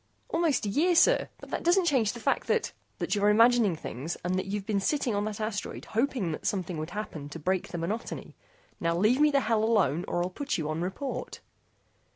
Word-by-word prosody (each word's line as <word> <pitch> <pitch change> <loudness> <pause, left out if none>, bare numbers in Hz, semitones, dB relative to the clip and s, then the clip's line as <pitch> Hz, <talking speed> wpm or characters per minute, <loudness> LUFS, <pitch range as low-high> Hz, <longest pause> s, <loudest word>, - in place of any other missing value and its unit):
"Almost 330 -8 +1
a - - -1
year, 340 - +2
sir, - - +4
but - - -12
that - - -2
doesn't 350 +2 +3
change 255 -10 +2
the 240 - -8
fact - - 0
that 465 - +1
" - - -42
"That - - -2
you're 205 0 +3
imagining 230 -3 +5
things 150 +2 -5
and 180 - 0
that 185 +1 -1
you've 200 0 -3
been 205 -2 0
sitting 260 +3 0
on 205 0 0
that 215 -1 -4
asteroid 215 -1 -4
hoping 230 -6 0
that 155 - -4
something 180 -4 -2
would 155 +1 -4
happen 165 -9 -6
to 145 - -7
break 185 +3 -1
the 175 - -6
monotony. 205 +8 -4 0.5
Now 170 0 0
leave 225 +9 +3
me 300 - +6
the 280 -1 +2
hell 220 -2 +1
alone 190 - +2
or 175 - 0
I'll 180 - -3
put 285 +8 -2
you 155 -3 -2
on 155 +2 -2
report." 190 +10 -4
210 Hz, 220 wpm, -28 LUFS, 175-245 Hz, 0.5 s, me